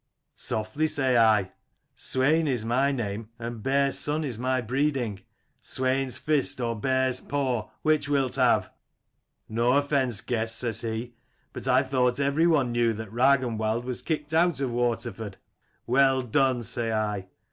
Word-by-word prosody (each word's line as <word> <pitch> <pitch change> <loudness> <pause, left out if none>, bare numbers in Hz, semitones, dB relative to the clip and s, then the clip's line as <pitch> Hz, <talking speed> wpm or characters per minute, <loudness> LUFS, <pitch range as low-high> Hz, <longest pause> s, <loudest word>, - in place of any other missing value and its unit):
"'Softly,' 110 +9 -1
say 135 -4 +1
I: 110 -5 +4 0.4
'Swain 150 +5 +1
is 125 -5 -1
my 130 +5 +2
name 110 -4 -4
and 115 -1 -6
Bear's 140 +2 +1
son 150 +2 0
is 125 -6 -3
my 130 +1 0
breeding. 125 -3 -1 0.4
Swain's 130 -1 0
fist 150 -2 0
or 115 -1 -1
bear's 130 +3 0
paw, 130 -6 -2
which 155 -2 +2
wilt 135 -3 +1
have? - - +2 0.4
' - - -51
'"No 115 +3 +1
offence, 135 -6 +1
guest,' 115 -1 -1
says 115 -3 -1
he: 115 +1 -4 0.4
'But - - -6
I 130 +1 +4
thought 130 -1 +1
every 140 +4 +2
one 145 -7 +2
knew 120 -1 +2
that 110 -1 -7
Ragnwald 120 -3 +2
was 125 -1 -4
kicked 155 -1 -3
out 165 -3 +3
of 135 -3 -1
Waterford 115 -4 -2 0.3
' - - -42
"'Well 130 +1 +3
done! 130 0 +1
'say 115 0 -1
I. 105 -3 -2
125 Hz, 155 wpm, -26 LUFS, 115-140 Hz, 0.4 s, I